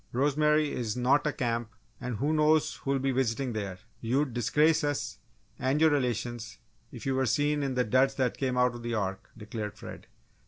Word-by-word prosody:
Rosemary 150 +3 +2
is 115 -2 -3
not 135 +4 +3
a - - +2
camp 120 -3 -2 0.3
and 125 -1 -4
who 145 +8 0
knows 155 0 +3
who'll 140 0 -1
be 135 0 0
visiting 130 0 0
there? 100 -4 -4 0.2
You'd 130 +3 0
disgrace 150 +7 +3
us 125 -7 -2 0.4
and 135 +3 +1
your 160 0 +5
relations 120 -4 -2 0.3
if 120 - -9
you 135 - +1
were 130 -1 +1
seen 145 +5 +1
in 135 -2 -1
the 125 - +3
duds 130 +4 +2
that 130 -3 0
came 130 -2 -1
out 125 -1 +3
of 120 - -8
the 120 0 -2
'Ark'!" 95 -2 -3
declared 105 -1 -6
Fred. - - -10
130 Hz, 190 wpm, -29 LUFS, 115-145 Hz, 0.4 s, your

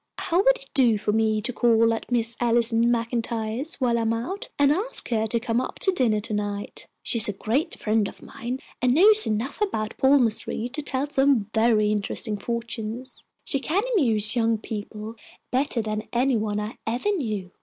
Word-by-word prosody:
How 340 - -1
would - - +4
it - - -8
do 240 -5 +4
for 210 - -1
me 215 -1 +1
to 250 - -2
call 230 -1 +3
at 225 - -6
Miss 230 -1 0
Allison 235 -1 +2
MacIntyre's 230 +3 -2
while 240 -3 +1
I - - 0
am 225 0 +1
out, 335 - -4
and 285 0 +4
ask 405 +11 -1
her 220 -2 0
to 235 +2 0
come 230 +1 0
up - - -6
to 385 - +2
dinner 240 - +1
to 215 +1 -4
night? 205 -1 -4 0.2
She 230 - 0
is 210 - +5
a - - -2
great 240 - -1
friend 215 -1 +1
of - - -11
mine 245 +2 -6 0.2
and 250 0 +3
knows 425 +5 +6
enough 225 - -2
about 220 - -1
palmistry 245 -4 +2
to 290 +4 -3
tell 275 -1 -2
some 270 -7 +1
very 220 -2 +3
interesting 210 +1 -2
fortunes. 235 +2 -5 0.2
She 275 - 0
can 345 +9 0
amuse 220 - +2
young 230 -1 +2
people 215 +1 -7 0.3
better 255 -2 0
than 215 0 -4
any 255 +2 +2
one 210 -1 -1
I 210 +1 -6
ever 240 - -1
knew. 215 - -3
230 Hz, 190 wpm, -24 LUFS, 215-265 Hz, 0.3 s, knows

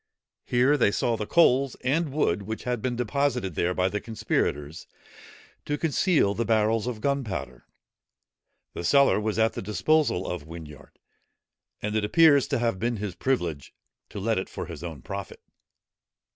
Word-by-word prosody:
Here 125 +4 +3
they 115 - +4
saw 115 +3 0
the 105 -1 -4
coals 135 -5 +3
and 150 +4 0
wood 105 - +1
which 110 +3 -6
had 125 -2 -2
been 125 0 -1
deposited 125 -4 -1
there 90 +4 0
by 90 0 +2
the 105 +2 -3
conspirators, 80 -8 -2 0.8
to 145 - -1
conceal 160 - +2
the 115 - -1
barrels 110 0 +1
of 115 -4 -4
gunpowder. 95 - -3 1.1
The - - -6
cellar 140 +6 +4
was 110 0 -2
at 110 0 +2
the - - -5
disposal 115 - +1
of 90 -4 -4
Whinyard: 80 -3 -11 0.9
and 105 +1 -2
it 110 - +1
appears 145 +4 +5
to 140 - 0
have 115 -5 -1
been 120 +2 -1
his 100 -2 -4
privilege 85 - -2 0.3
to - - -7
let 110 +1 0
it 95 - -6
for - - -6
his 85 -3 -9
own 80 -7 -7
profit. - - -7
110 Hz, 160 wpm, -26 LUFS, 95-130 Hz, 1.1 s, appears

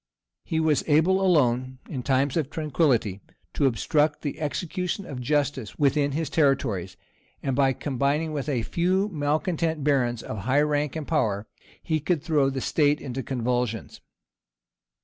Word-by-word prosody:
He 160 - -1
was 155 -2 +2
able 165 +5 +4
alone, 130 -8 +2
in 135 -5 -4
times 135 +1 +1
of 155 -5 0
tranquillity, 140 - 0 0.3
to 140 - +2
obstruct 145 +6 +1
the 145 - -4
execution 180 +5 -3
of 130 -3 -6
justice 140 -3 -1
within 145 0 +2
his 160 +1 -1
territories; 115 - 0 0.5
and 135 -2 0
by 135 -1 +3
combining 145 +4 -1
with 145 0 -3
a 125 -5 0
few 185 - +1
malecontent 160 0 -1
barons 125 -5 +1
of 110 - -5
high 130 +8 +2
rank 150 -1 0
and 155 -3 -4
power, 110 -10 0 0.4
he 160 -2 0
could 155 0 -1
throw 150 -5 +2
the 135 -1 -3
state 145 +1 +2
into 135 -1 -5
convulsions. 125 -3 -2
145 Hz, 150 wpm, -25 LUFS, 130-155 Hz, 0.5 s, able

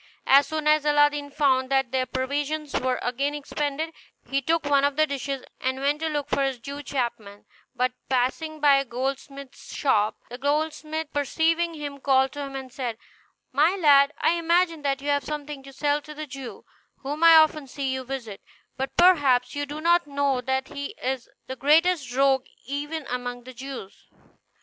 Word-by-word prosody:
As 275 +1 +6
soon 310 -1 -3
as 305 -1 +4
Aladdin 290 -1 +3
found 265 -3 +2
that 270 -3 +1
their 260 -1 0
provisions 285 +3 -2
were 255 0 0
again 275 +4 -1
expended, 295 +2 -3 0.3
he 275 0 0
took 325 +3 0
one 285 -1 +3
of 285 0 +2
the 310 +1 +4
dishes, 275 -2 -4 0.2
and 260 0 -1
went 285 +2 +1
to 320 - 0
look 290 -2 -2
for - - 0
his 270 -2 0
Jew 280 +5 -7
chapman; 235 -7 -4 0.3
but 250 +1 +1 0.2
passing 270 +5 -1
by 290 -2 +6
a 275 - +1
goldsmith's 270 +2 -6
shop, 215 -7 +1
the 245 +1 -9
goldsmith 310 +2 -2
perceiving 330 +4 +1
him 290 -2 -6
called 265 -1 +3
to 290 - -6
him 275 -1 -6
and 260 -2 -7
said, 245 -4 -4 0.5
"My 310 +8 +3
lad, 285 -5 +5
I - - +3
imagine 335 -1 +2
that 275 -1 -1
you 290 - -2
have 285 0 +2
something 295 -2 -5
to 275 0 -12
sell 290 +2 0
to 300 +1 -11
the 310 +1 -5
Jew, 270 -3 -9 0.4
whom 295 +4 -3
I 330 -1 +9
often 310 -2 +4
see 265 0 -3
you 260 0 -3
visit; 245 -6 -6 0.4
but 265 +1 -4
perhaps 290 -9 +4
you 290 0 -3
do 295 +2 -6
not 345 0 +3
know 280 -2 0
that 265 0 -2
he 280 0 -6
is 260 -1 -3 0.2
the 260 - -6
greatest 300 +1 +3
rogue 270 -1 +3 0.2
even 290 +3 -4
among 245 -1 -4
the 255 +1 -11
Jews. 255 -5 -9
280 Hz, 185 wpm, -25 LUFS, 260-300 Hz, 0.5 s, I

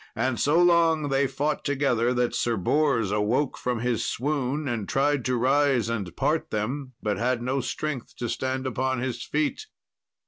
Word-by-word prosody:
And 120 +1 0
so 150 +4 +3
long 165 -4 +4
they 135 0 +2
fought 145 +3 -2
together 130 -4 +1
that 125 -1 0
Sir 120 -2 0
Bors 115 - +1
awoke 110 +7 +1
from 125 -3 -2
his 120 -2 0
swoon, 145 +2 -1
and 115 -5 -3
tried 140 -1 +1
to 125 -1 +1
rise 130 -2 +2
and 100 -7 -3
part 160 +1 0
them, 130 +5 -3
but 105 -2 0
had 120 0 0
no 130 +2 0
strength 130 +1 -4
to 120 - -4
stand 130 +2 -2
upon 130 0 -1
his 120 -1 -3
feet. 155 - -2
130 Hz, 170 wpm, -26 LUFS, 120-145 Hz, -, long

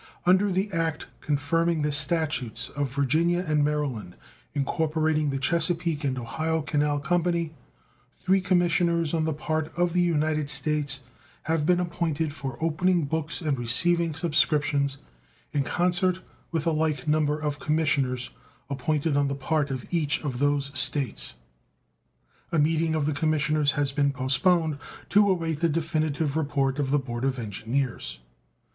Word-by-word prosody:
Under 190 +3 +4
the 190 +3 0
act 165 -3 -1
confirming 155 +2 0
the 150 - +1
statutes 145 -6 -1
of 140 -2 -3
Virginia 160 +6 +1
and 150 -1 +2
Maryland 140 -11 -2 0.4
incorporating 155 +1 +1
the 135 - -1
Chesapeake 165 +1 0
and 135 -2 -1
Ohio 155 +7 -2
Canal 145 -1 +1
Company, 170 +1 0 0.7
three 190 +1 +4
commissioners 170 -3 +2
on 160 -1 +1
the 160 - 0
part 155 +1 -2
of 175 -1 +1
the 180 - +3
United 155 -3 +1
States 145 -1 -1 0.4
have 160 -1 0
been 180 -1 +4
appointed 165 -3 -1
for 135 -5 -6
opening 165 +1 +1
books 160 +3 -2
and 150 -5 -1
receiving 165 +7 +2
subscriptions, 150 -3 +1 0.6
in 145 - +2
concert 180 +4 +1 0.3
with 160 -3 -1
a 165 - +3
like 155 -3 -1
number 150 -1 +2
of 150 -1 -3
commissioners 140 -5 0 0.4
appointed 145 +2 0
on 145 0 +2
the 140 - -2
part 145 +1 0
of 130 -2 -4
each 155 -4 +1
of 130 -5 -3
those 140 0 +1
States. 135 - +1 1.2
A 165 - +1
meeting 160 +1 +2
of 155 -2 0
the 155 - 0
commissioners 150 -1 +1
has 145 -2 0
been 140 0 +2
postponed, 145 +4 +2 0.3
to 205 +1 +5
await 165 -5 0
the 170 0 +2
definitive 155 -2 -1
report 140 -3 0
of 140 -2 0
the 145 - +3
board 125 -3 -4
of 135 -1 0
engineers. 120 +4 -3
150 Hz, 145 wpm, -26 LUFS, 140-165 Hz, 1.2 s, to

